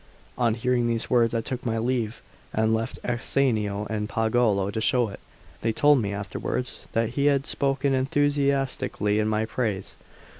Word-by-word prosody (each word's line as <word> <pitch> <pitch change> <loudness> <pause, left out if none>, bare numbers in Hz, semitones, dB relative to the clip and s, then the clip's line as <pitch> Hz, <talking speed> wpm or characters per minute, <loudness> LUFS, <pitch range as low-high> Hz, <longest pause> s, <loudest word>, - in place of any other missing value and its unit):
On 115 -3 +2
hearing 120 0 +1
these 115 -1 -1
words 120 -2 +3
I 115 - +1
took 125 +2 -4
my 115 -2 -1
leave, 115 -1 -1 0.3
and 110 +1 +2
left 115 0 -2
Ascanio 115 -4 0
and 105 -1 -3
Pagolo 110 -3 +1
to 110 - -3
show 120 0 +2
it. 100 - -9 0.4
They 115 - +1
told 145 +3 +4
me 100 -2 -2
afterwards 100 +5 -4
that 115 -1 +1
he 140 +4 -1
had 140 -1 +2
spoken 135 0 0
enthusiastically 135 -5 +1
in 110 - +1
my 110 0 +1
praise. 110 -4 -3
115 Hz, 160 wpm, -26 LUFS, 110-130 Hz, 0.4 s, told